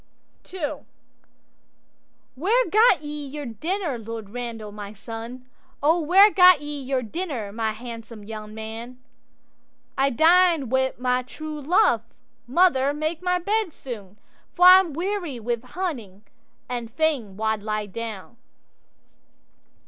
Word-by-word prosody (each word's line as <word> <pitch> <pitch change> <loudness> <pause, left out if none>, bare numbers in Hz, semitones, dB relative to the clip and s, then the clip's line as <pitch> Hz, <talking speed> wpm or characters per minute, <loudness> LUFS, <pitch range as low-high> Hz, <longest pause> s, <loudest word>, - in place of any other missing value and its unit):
'II'Where 430 - +2
gat 425 - +5
ye 295 -1 -6
your 290 +1 -6
dinner, 310 - -3
Lord 225 -2 -7
Randal, 230 -3 -6
my 205 0 -8
son? 225 +4 -8 0.4
Where 350 +6 +5
gat 365 -4 +7
ye 290 -1 -6
your 260 -1 -1
dinner, 255 - -4
my 220 0 -2
handsome 230 -1 -9
young 215 0 -8
man?'—'I 245 +4 -7
dined 325 -1 +4
wi' 260 0 +2
my 250 0 +1
true 305 +4 -8
love; 300 - +3 0.5
mother, 280 -2 +3
make 310 +2 -3
my 360 0 +1
bed 405 0 -1
soon, 210 -6 -9 0.4
For 355 - +4
I'm 365 -3 +8
weary 350 -5 -3
wi' 235 +1 -1
hunting, 250 - -5 0.4
and 240 -2 -4
fain 260 -8 -1
wald 220 -1 -1
lie 215 0 -2
down. 220 +1 -7
260 Hz, 115 wpm, -24 LUFS, 225-330 Hz, 0.5 s, I'm